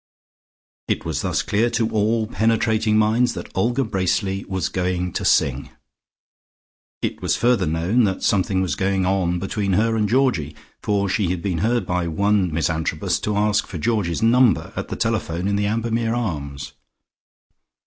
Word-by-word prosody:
It - - -2
was - - -2
thus - - -1
clear 110 +4 +1
to 115 -1 0
all 110 +1 +1
penetrating 110 -1 +1
minds 115 +3 +2
that - - -7
Olga 120 +7 +1
Bracely 95 -2 -1
was 95 -1 -2
going 90 -1 -2
to - - -3
sing. - - +2 1.3
It - - -2
was - - +1
further 120 -7 +2
known 85 +10 +2
that 95 -2 -2
something 95 -1 +1
was 90 -6 -1
going 95 -1 0
on 90 -2 +1
between 100 +1 -2
her 115 +4 +2
and 105 -2 0
Georgie, 120 - +1 0.3
for 100 -1 0
she 95 -1 0
had 90 -1 -3
been 90 -5 -1
heard 120 +5 +1
by 90 -1 -1
one 100 +2 +1
Miss 80 +1 0
Antrobus 80 -1 -1
to 105 -1 -2
ask 105 0 +1
for 90 - -6
Georgie's 100 0 -1
number 120 0 +3
at - - -4
the - - -5
telephone 85 +3 -1
in 100 - +1
the 100 0 0
Ambermere 115 +1 -1
Arms. 70 - -4
100 Hz, 165 wpm, -22 LUFS, 90-115 Hz, 1.3 s, number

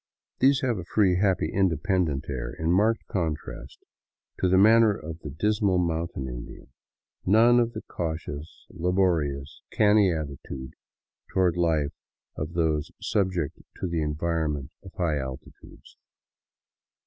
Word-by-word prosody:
These 135 +1 +4
have 120 -6 0
a - - -5
free, 90 0 +2
happy, 95 -1 +1
independent 85 -5 +1
air, 65 -4 -4
in 80 +1 -1
marked 110 +5 +2
contrast 80 -5 -4 0.6
to 95 - +2
the 95 - +4
manner 110 +1 +6
of 80 +1 -8
the 75 - -7
dismal 100 - +1
mountain 85 -5 -1
Indian; - - -9 0.5
none 115 +5 +5
of 120 -1 +1
the 110 - -6
cautious, 80 -2 -5
laborious, 80 -6 0
canny 105 -2 +4
attitude 70 -4 -6 0.6
toward 90 -2 +2
life 80 -4 +1 0.4
of 75 +2 -5
those 80 -3 0
subject 90 -7 -1 0.2
to - - -2
the 85 -2 -1
environment 75 -2 -2
of 95 - -12
high 80 -5 0
altitudes. 65 +2 -10
85 Hz, 125 wpm, -26 LUFS, 75-95 Hz, 0.6 s, manner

